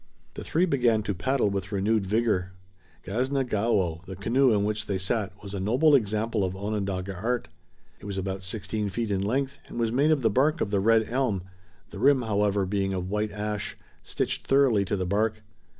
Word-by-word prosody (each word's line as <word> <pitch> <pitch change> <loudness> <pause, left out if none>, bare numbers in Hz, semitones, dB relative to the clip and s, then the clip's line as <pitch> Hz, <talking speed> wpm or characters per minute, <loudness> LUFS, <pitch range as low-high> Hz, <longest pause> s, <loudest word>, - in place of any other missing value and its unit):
The - - -7
three 170 +4 +2
began 120 - +2
to 100 - -1
paddle 105 +4 0
with 100 0 -3
renewed 100 0 +1
vigor. 100 -4 0 0.5
Gasna 130 +7 0
Gaowo, 100 -8 0
the 95 - -6
canoe 120 +7 +3
in 105 -2 +2
which 105 +1 -2
they 100 - 0
sat, 95 +2 -1
was 100 -1 -7
a 100 - -3
noble 125 +11 +3
example 110 -3 +1
of 95 0 -2
Onondaga 100 -2 -3
art. 115 +6 -2 0.5
It - - -13
was 100 -1 -4
about 95 0 -3
sixteen 100 +2 -3
feet 115 +2 -2
in 95 -1 0
length 130 +7 -1
and - - -7
was 115 -1 +1
made 140 +6 +3
of 150 -5 +2
the 110 - +3
bark 150 +8 +2
of 100 - -1
the 100 - +2
red 110 +2 +3
elm, 120 -7 0 0.5
the 100 - -8
rim, 135 +1 +4
however, 105 -2 +1
being 95 0 -1
of 90 +1 -4
white 105 0 -1
ash, 105 0 -4 0.2
stitched - - -2
thoroughly 135 -7 +4
to 100 - -1
the 95 -2 -2
bark. 105 +3 0
105 Hz, 200 wpm, -27 LUFS, 95-120 Hz, 0.5 s, rim